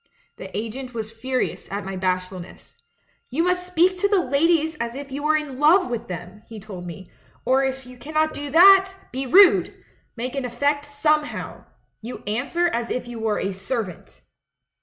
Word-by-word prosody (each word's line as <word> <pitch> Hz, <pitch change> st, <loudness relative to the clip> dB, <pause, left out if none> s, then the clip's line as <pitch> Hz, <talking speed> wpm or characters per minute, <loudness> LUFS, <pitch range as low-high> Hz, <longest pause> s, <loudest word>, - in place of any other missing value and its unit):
The -, -, -7 dB
agent 240 Hz, +3 st, -5 dB
was 220 Hz, -1 st, -4 dB
furious 255 Hz, +3 st, -3 dB
at 200 Hz, 0 st, -4 dB
my 195 Hz, 0 st, -5 dB
bashfulness. 185 Hz, -1 st, -4 dB, 0.5 s
'You 300 Hz, +7 st, 0 dB
must 360 Hz, 0 st, 0 dB
speak 360 Hz, +1 st, +2 dB
to 405 Hz, -, +3 dB
the 400 Hz, -1 st, +3 dB
ladies 320 Hz, +3 st, +2 dB
as 235 Hz, +1 st, -3 dB
if 275 Hz, 0 st, -8 dB
you 280 Hz, +2 st, -4 dB
were 310 Hz, +1 st, +3 dB
in 285 Hz, -4 st, -6 dB
love 310 Hz, -1 st, +4 dB
with 235 Hz, -2 st, -4 dB
them,' 180 Hz, +3 st, -8 dB
he 225 Hz, -2 st, -9 dB
told 190 Hz, -4 st, -9 dB
me; 175 Hz, +1 st, -10 dB, 0.3 s
'or 265 Hz, +1 st, +3 dB
if 265 Hz, -1 st, -2 dB
you 250 Hz, 0 st, -13 dB
cannot 310 Hz, +3 st, 0 dB
do 290 Hz, 0 st, -5 dB
that, 385 Hz, +4 st, +7 dB, 0.2 s
be 265 Hz, +1 st, -3 dB
rude 385 Hz, +7 st, +7 dB
I -, -, -23 dB, 0.3 s
Make 245 Hz, +2 st, -4 dB
an 275 Hz, -1 st, -2 dB
eff'ect 285 Hz, +4 st, 0 dB
somehoic. 300 Hz, +1 st, -1 dB, 0.4 s
You 235 Hz, +3 st, -8 dB
answer 275 Hz, +12 st, 0 dB
as 235 Hz, -7 st, -2 dB
if 250 Hz, -, -3 dB
you 240 Hz, -1 st, -7 dB
were 220 Hz, -1 st, 0 dB
a 195 Hz, -, -2 dB
servant.' 195 Hz, -, -5 dB
260 Hz, 180 wpm, -23 LUFS, 220-310 Hz, 0.5 s, that